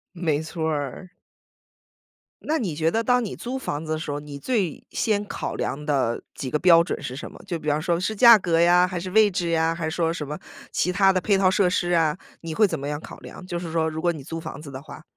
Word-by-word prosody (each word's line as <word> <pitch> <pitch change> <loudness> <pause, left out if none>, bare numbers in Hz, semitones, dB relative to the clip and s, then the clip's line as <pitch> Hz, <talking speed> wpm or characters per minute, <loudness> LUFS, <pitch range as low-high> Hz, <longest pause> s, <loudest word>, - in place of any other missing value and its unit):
没 160 -4 0
错 160 0 -3
儿。 145 +4 -4 1.3
那 315 +1 -1
你 185 - -2
觉 160 +1 +1
得 225 +4 0
当 250 0 +3
你 200 - -5
租 250 +2 -5
房 155 - -4
子 155 0 -3
的 - - -1
时 155 -2 -5
候， 145 - -3
你 145 -1 -9
最 195 - -2
先 210 -2 0
考 - - -4
量 145 +3 -3
的 130 -6 0
几 130 - -5
个 150 - +1
标 170 -1 +6
准 - - -4
是 130 - -5
什 135 - -7
么？ - - -14
就 170 - -2
比 155 -1 -9
方 150 +1 +1
说 170 +1 0
是 220 +4 -2
价 235 +1 +9
格 170 -4 +1
呀， 175 +1 +5
还 180 -1 -4
是 185 - -5
位 215 0 +5
置 175 -2 -1
呀， 165 0 +2
还 165 -1 -4
是 160 - -5
说 165 -1 +1
什 150 -4 -5
么 150 +1 -5 0.3
其 180 - 0
他 195 +1 +4
的 185 - +1
配 195 +1 +2
套 190 -1 +4
设 190 -1 +3
施 175 -1 0
啊。 160 -3 +3 0.3
你 165 -1 -5
会 215 +4 +4
怎 165 -4 -3
么 140 - -5
样 150 0 -3
考 - - -10
量， 180 - -11
就 175 - -3
是 170 -1 -5
说 160 -1 +1
如 160 0 -5
果 175 0 +2
你 150 -4 -9
租 165 +4 -5
房 160 -3 -8
子 150 - -9
的 130 0 -7
话？ 155 - -11
170 Hz, 285 characters per minute, -24 LUFS, 155-185 Hz, 1.3 s, 价